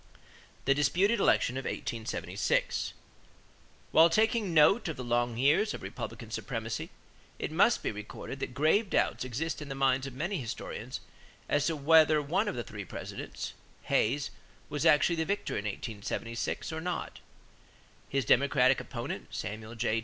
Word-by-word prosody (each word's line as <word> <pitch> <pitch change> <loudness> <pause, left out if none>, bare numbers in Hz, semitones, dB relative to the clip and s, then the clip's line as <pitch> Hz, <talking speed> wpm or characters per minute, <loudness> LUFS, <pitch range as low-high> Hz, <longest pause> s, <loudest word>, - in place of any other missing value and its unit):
=The 135 - +5
Disputed 180 - +2
Election 130 -8 +3
of 135 - -4
1876.= 115 -1 -1 1.0
While 165 +1 +7
taking 220 +1 +2
note 165 +7 +5
of 160 - -4
the 125 - -4
long 120 -1 0
years 150 - +3
of - - -9
Republican - - -7
supremacy, - - -4 0.5
it - - -3
must 200 +9 +3
be - - 0
recorded 105 +5 -7
that 125 - -4
grave 160 +9 +3
doubts - - +1
exist 135 +7 -3
in 145 - -7
the 135 - -4
minds 135 0 +2
of 130 - -8
many 175 +7 -2
historians 120 -4 -5 0.5
as 145 0 +2
to 165 - 0
whether 155 +1 +5
one 170 +9 0
of - - -2
the 120 - -3
three 105 -2 -7
Presidents, - - -6 0.3
Hayes, 140 +6 +1 0.4
was 150 +3 +1
actually 160 +2 +4
the 160 - +1
victor 200 +3 -2
in 105 - -3
1876 110 +5 -4
or 160 - -3
not. 180 +1 -4 0.9
His 135 -2 0
Democratic 130 +1 +4
opponent, - - -5
Samuel 110 +2 -6
J. 115 -1 +1
140 Hz, 155 wpm, -30 LUFS, 120-165 Hz, 1.0 s, While